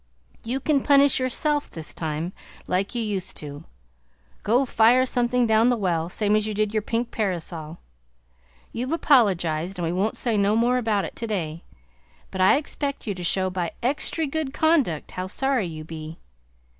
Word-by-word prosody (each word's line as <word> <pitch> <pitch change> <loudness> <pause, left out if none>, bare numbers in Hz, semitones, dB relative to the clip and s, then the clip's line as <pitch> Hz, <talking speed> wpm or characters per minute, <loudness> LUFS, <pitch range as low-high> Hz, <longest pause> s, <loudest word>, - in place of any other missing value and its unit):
You 245 +4 -2
can 285 0 +1
punish 280 -1 +4
yourself 290 +3 0
this 160 -2 -8
time, 160 +3 -3 0.3
like 195 +5 -1
you 235 - 0
used 200 -4 -3
to. 145 +1 -8 0.8
Go 245 +6 +2
fire 240 +2 +4
something 245 -1 +1
down 220 +1 +4
the 245 - +2
well, 170 -5 -1
same 210 +2 +1
as 215 0 +1
you 215 - -3
did 215 0 0
your 215 - +1
pink 230 +3 -2
parasol! 170 -5 -3 0.9
You've 255 +6 -3
apologized 190 - +2
and 175 - -2
we 165 - -1
won't 195 +5 -1
say 230 -4 0
no 200 +1 +3
more 245 +2 +3
about 215 -4 0
it - - -8
today, 175 -8 -4 0.7
but 190 - -3
I 185 - +6
expect 285 -1 -4
you 210 - -2
to 180 -1 -7
show 185 +2 +1
by 180 -2 -3
extry 295 +5 0
good 290 -1 -3
conduct 295 - +1
how 185 0 -4
sorry 260 0 0
you 155 -2 -7
be! 160 0 -8
215 Hz, 170 wpm, -24 LUFS, 175-250 Hz, 0.9 s, I